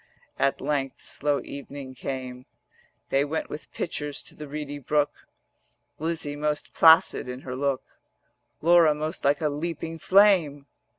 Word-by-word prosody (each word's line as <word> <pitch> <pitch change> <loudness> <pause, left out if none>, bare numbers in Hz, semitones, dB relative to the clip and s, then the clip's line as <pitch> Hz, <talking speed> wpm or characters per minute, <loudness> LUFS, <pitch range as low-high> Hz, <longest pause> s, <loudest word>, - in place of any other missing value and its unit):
At 140 0 +2
length 135 -1 -1
slow 145 0 -1
evening 140 -1 -8
came: 130 -1 -6 0.6
They 135 +1 +3
went 155 +2 -3
with 150 - -8
pitchers 150 -4 -4
to - - -12
the 150 - -9
reedy 145 0 -5
brook; 145 +2 -1 0.7
Lizzie 160 -2 -2
most 150 0 -2
placid 160 -5 +5
in 125 +1 -6
her 125 -2 -6
look, 135 0 -1 0.8
Laura 165 -2 +6
most 155 +3 -4
like 140 +2 +2
a 155 - +2
leaping 165 +2 -4
flame. 180 -9 +4
145 Hz, 135 wpm, -26 LUFS, 140-160 Hz, 0.8 s, Laura